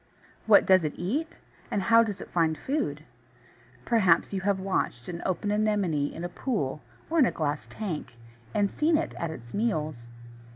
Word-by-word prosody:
What 210 -2 +7
does 185 -2 +5
it 150 - -2
eat, 285 - -3 0.3
and 205 - 0
how 230 +3 +6
does 210 -4 -2
it - - -10
find 160 -2 +2
food? 255 - -2 0.8
Perhaps 190 -6 +3
you 190 - -1
have 195 0 +1
watched 185 -10 -2
an 170 -1 -5
open 190 +2 -1
Anemone 205 -9 +1
in 165 - -7
a - - -1
pool, 175 - -2 0.3
or 330 +1 +1
in 265 - +6
a - - 0
glass 150 -2 -2
tank, 175 - -5 0.4
and 200 - +1
seen 310 +1 +2
it 325 - -2
at 170 - -2
its 120 -7 -9
meals. 155 - -2
190 Hz, 175 wpm, -27 LUFS, 155-215 Hz, 0.8 s, What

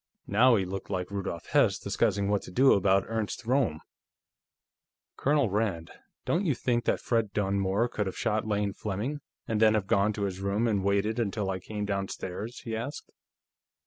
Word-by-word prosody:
Now 120 +5 +5
he 95 -3 +1
looked 95 +2 -6
like 95 -1 -3
Rudolf 95 -5 -4
Hess - - +4
discussing 100 -3 0
what 100 0 +1
to - - -10
do 130 +7 +5
about 95 0 +3
Ernst 110 0 -3
Roehm. 120 - +1 1.3
"Colonel 140 -6 +2
Rand; 100 -6 -1 0.3
don't 175 +4 +1
you 155 -8 +1
think 120 0 0
that - - +1
Fred 115 -4 0
Dunmore 100 +2 +1
could 105 -4 -2
have 95 - -5
shot 110 -1 0
Lane 105 -2 0
Fleming, 110 +11 -3 0.3
and 110 -1 -1
then 110 -1 +6
have 105 -3 0
gone 100 +2 +2
to 105 - -3
his 95 -2 -3
room 100 +4 0
and 100 -4 +1
waited 100 +3 +1
until 100 -3 -1
I 95 - -3
came 105 +3 -5
downstairs?" 100 +2 -4
he 115 -2 -4
asked. 130 +7 -6
105 Hz, 175 wpm, -28 LUFS, 95-115 Hz, 1.3 s, then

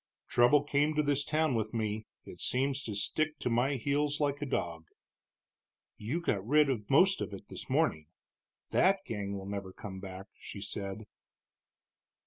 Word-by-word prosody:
Trouble 125 +5 +5
came 145 +1 +1
to 150 - +3
this 145 -1 +1
town 155 -1 +1
with 110 0 -1
me; 110 -1 -2 0.2
it - - -11
seems 135 +2 +1
to 105 - -4
stick 150 +10 0
to 125 - -2
my 125 +4 +2
heels 145 +3 0
like 145 -1 0
a 145 - -2
dog." 85 -8 -2 1.1
"You 120 +11 -2
got 105 - 0
rid 145 +4 +4
of 105 -5 -4
most 185 +8 +5
of 105 - -3
it 95 - -13
this - - -8
morning 75 -1 +1 0.6
that 190 +1 +4
gang 100 -2 -3
will 95 - -7
never 100 -1 -5
come 95 0 -8
back," 95 0 -7
she 100 - -8
said. 100 +1 -5
120 Hz, 165 wpm, -31 LUFS, 100-145 Hz, 1.1 s, Trouble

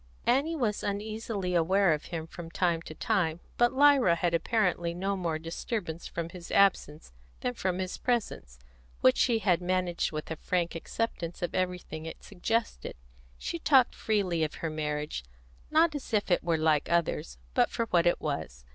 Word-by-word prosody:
Annie 280 +7 +2
was 230 -8 0
uneasily 205 -2 -3
aware 175 +1 +4
of 150 - -4
him 165 -2 -5
from 165 0 -9
time 170 -1 +1
to 155 - -9
time, 180 -8 0 0.2
but 240 0 +5
Lyra 270 -9 +5
had 170 0 0
apparently 175 -2 +1
no 195 +3 -1
more 170 -4 -1
disturbance 165 +1 -4
from 170 -1 -4
his 170 0 -10
absence 160 - +2 0.3
than 250 - -1
from 185 -6 -1
his 185 -1 -4
presence, 205 - -2 0.4
which 130 - +6
she 235 -2 +3
had 180 -5 +2
managed 180 -1 0
with 155 0 -5
a - - -1
frank 175 0 -1
acceptance 170 -1 -4
of 175 - -2
everything 180 -3 -3
it - - -9
suggested. 205 - -2 0.4
She 335 - -4
talked 265 -6 +4
freely 190 -7 0
of 155 - -2
her 165 - -3
marriage, 150 - -3 0.5
not 315 +1 +4
as 290 -3 -6
if 205 -2 0
it 175 - +3
were 165 -1 +1
like 155 -2 +2
others, 165 - 0 0.2
but - - +3
for 230 - -1
what 175 -1 +4
it 175 - +3
was. 80 - -4
175 Hz, 175 wpm, -29 LUFS, 165-215 Hz, 0.5 s, which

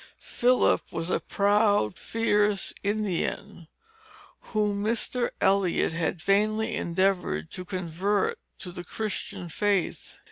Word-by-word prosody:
Philip 250 +1 +2
was 165 +2 -3
a - - +2
proud, 205 - +2
fierce 210 -3 +1
Indian, 200 -5 -2 0.8
whom 210 -2 0
Mr. 235 +2 0
Eliot 190 -4 +2
had 165 +1 -1
vainly 215 +5 +1
endeavored 175 - 0
to 185 - -6
convert 185 +2 -1 0.2
to 180 - -6
the 175 0 -7
Christian 200 -1 -4
faith. 200 +2 -1
200 Hz, 105 wpm, -27 LUFS, 175-210 Hz, 0.8 s, Philip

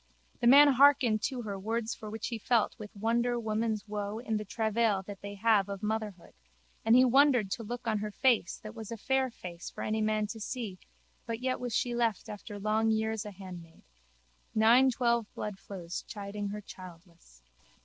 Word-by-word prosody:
The 235 - +2
man 285 +4 +9
hearkened 270 -5 +5
to 255 -4 -3
her 200 -2 -5
words 225 +3 -2
for 215 -2 -9
he 230 +1 -4
felt 230 0 +2
with 210 -1 -7
wonder 235 +3 +1
women's 220 -1 -2
woe 205 0 -4
in 225 -2 -2
the 210 - -3
travail 220 -1 0
that 200 0 -9
they 200 0 -7
have 205 -1 +3
of 200 +1 -6
motherhood 210 -4 -3 0.5
and 225 +1 +5
he 255 +1 +7
wondered 255 -5 +4
to 230 - -3
look 240 +2 -6
on 215 -2 +1
her 210 +1 -3
face 235 -4 +1
that 215 0 -8
was 225 -1 -8
a 230 - -4
fair 265 +4 +1
face 175 -7 -8
for - - -7
any 215 0 -1
man 215 0 +1
to 225 - -10
see 215 -4 -5 0.5
but 230 -1 -3
yet 255 0 -1
was 245 -3 -3
she 245 - 0
left 230 -4 0
after 205 0 -8
long 215 +2 +1
years 220 -1 0
a 210 - -6
handmaid. 180 -4 -11 0.7
Nine 235 +4 +6
twelve 235 -3 +1
bloodflows 190 -4 -6
chiding 205 -1 -5
her 210 +1 -5
childless. 170 - -14
220 Hz, 185 wpm, -30 LUFS, 205-235 Hz, 0.7 s, man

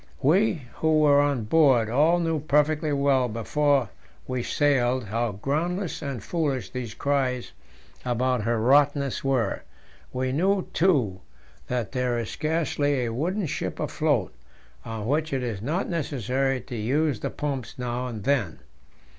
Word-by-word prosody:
We 170 +1 +3
who 160 -1 +3
were 145 -1 +5
on 140 -5 0
board 130 -2 +4
all 150 +9 +3
knew 165 -2 0
perfectly 150 +1 +1
well 140 -2 +2
before 135 +3 +1 0.4
we 130 -1 -2
sailed 130 -2 +1
how 115 +1 -2
groundless 165 - -2
and 135 -7 -5
foolish 140 - -2
these 125 -4 -5
cries 130 -3 -1 0.5
about 125 0 0
her 115 +2 0
"rottenness" 140 +2 +3
were; 130 -7 0 0.5
we 130 0 -1
knew, 190 +7 +2
too, 130 - +2 0.5
that 125 -3 -2
there 125 -2 0
is 115 -2 -3
scarcely 145 -4 0
a 115 - -3
wooden 180 - -1
ship 150 - -4
afloat - - 0 0.5
on 110 -2 -5
which 155 +5 0
it 130 -2 -1
is 110 -5 -3
not 155 - -1
necessary 135 - -1
to 125 - -8
use 130 +4 0
the - - -3
pumps 140 -5 -4
now 125 0 -3
and 110 -5 -6
then. 115 - 0
135 Hz, 145 wpm, -25 LUFS, 120-150 Hz, 0.5 s, were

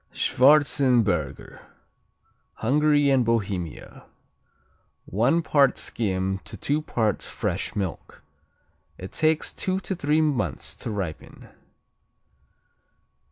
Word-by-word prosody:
Schwarzenberger 125 - +2 0.9
Hungary 145 +3 +2
and 130 -2 +3
Bohemia 100 -8 -3 1.0
One 125 - +1
part 140 -3 +3
skim 95 -3 -2
to - - -10
two 150 +2 -1
parts 110 -8 -1
fresh - - -3
milk. 95 -4 -5 0.7
It 95 - -8
takes 155 0 0
two 185 0 -2
to 195 - -4
three 155 -3 +1
months 150 -4 -1
to - - -7
ripen. 95 -7 -6
125 Hz, 90 wpm, -25 LUFS, 95-150 Hz, 1.0 s, and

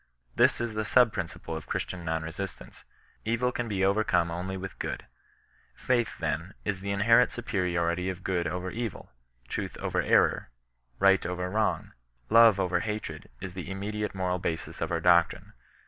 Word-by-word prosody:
This - - +4
is 120 -2 -2
the 110 0 -1
sub 115 0 +4
principle 85 -2 -5
of 80 - -7
Christian 90 -1 -3
non 80 -1 -1
resist 80 +2 -5
ance. - - -13
'^ - - -20 0.4
Evil 115 +3 +1
can 120 -1 -3
be 95 -3 +1
overcome 100 -4 +2
only 90 +3 -4
with 95 0 -7
goodV - - -4 0.7
Faith, 120 -3 0
then, 90 +5 -3
in 105 - 0
the 100 +1 -5
inherent 115 +5 +4
superiority 90 -5 -1
oigood 90 -1 -2
over 90 0 -3
^vt?, 115 -5 -5 0.4
truth - - -4
over - - -1
error, - - +3 0.5
right 95 0 +5
over 90 +1 -3
wrong, 110 +1 0 0.4
love 115 -3 +7
over 90 -1 +1
hatred, 105 -9 -5
is 95 - -6
the 90 -1 -6
immediate 105 +2 -3
moral 90 -1 -1
basis 80 -2 -4
of - - -1
our 85 -1 0
doctrine. 85 -1 +3
95 Hz, 165 wpm, -28 LUFS, 90-105 Hz, 0.7 s, love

